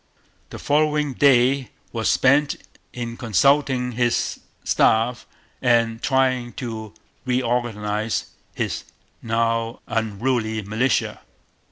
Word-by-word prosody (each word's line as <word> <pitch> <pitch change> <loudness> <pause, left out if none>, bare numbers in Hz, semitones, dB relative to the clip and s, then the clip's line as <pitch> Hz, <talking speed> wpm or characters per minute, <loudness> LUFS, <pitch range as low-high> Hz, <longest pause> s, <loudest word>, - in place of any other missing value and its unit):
The - - -8
following 150 -1 +1
day 130 -1 +3 0.2
was 115 -2 0
spent 140 +2 +3 0.4
in 120 -1 -5
consulting 125 - +2
his 120 0 0 0.2
staff 115 +2 +2 0.3
and 115 -1 +2
trying 130 -3 +1
to 110 -3 -6 0.3
reorganize 115 -4 -1 0.3
his - - -2 0.4
now 115 0 0
unruly 110 0 -1
militia. 110 +6 0
120 Hz, 85 wpm, -22 LUFS, 115-130 Hz, 0.4 s, day